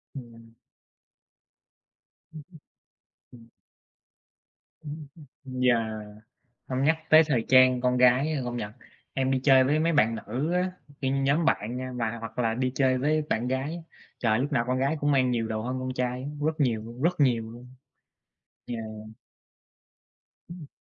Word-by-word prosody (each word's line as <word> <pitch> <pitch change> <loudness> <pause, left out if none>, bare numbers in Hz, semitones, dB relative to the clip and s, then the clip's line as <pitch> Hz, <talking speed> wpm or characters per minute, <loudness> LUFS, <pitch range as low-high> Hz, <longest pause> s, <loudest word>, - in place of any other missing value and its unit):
Ừm. 115 -3 -12 1.8
Ừm 155 - -8
hưm. 160 - -14 0.8
Ừm. 115 -2 -16 1.3
Ừm 150 -1 -8 0.4
hưm. 130 -1 -5
Yeah. 125 -2 +4 0.9
Hông 130 0 -1
nhắc 160 +2 +3
tới 155 +1 +8
thời 125 -7 0
trang 130 -1 +6
con 125 0 +1
gái, 125 +5 +4
a, 150 - -1
công 120 0 -4
nhận, 105 -3 -5 0.4
em 130 -1 0
đi 130 -1 +1
chơi 130 -2 +6
với 145 +4 +2
mấy 165 +1 +1
bạn 115 -6 +3
nữ 130 +10 -3
á, 180 +1 0 0.3
cái 130 -1 0
nhóm 140 +4 +1
bạn 120 -6 0
nha 130 0 -5
và 115 -1 -2
hoặc 115 0 -8
là 115 -2 +1
đi 130 +1 -1
chơi 130 -1 +2
với 155 +4 +1
bạn 120 +3 0
gái, 145 +6 -3 0.3
trời, 110 -2 +1
lúc 140 +4 -2
nào 120 -4 +2
con 130 +1 0
gái 140 +4 0
cũng 145 0 +1
mang 130 -2 +3
nhiều 115 -2 -1
đồ 110 0 -3
hơn 125 +3 -3
con 130 0 -3
trai 125 0 -2
á, 140 - -5 0.2
rất 155 0 -2
nhiều 115 -6 +1
luôn, 120 +3 -9
rất 175 +1 +1
nhiều 115 -5 +2
luôn. 125 +2 -13 0.9
Yeah. 115 -2 -5 1.7
Ừm. 170 -4 -9
130 Hz, 165 wpm, -27 LUFS, 120-145 Hz, 1.8 s, tới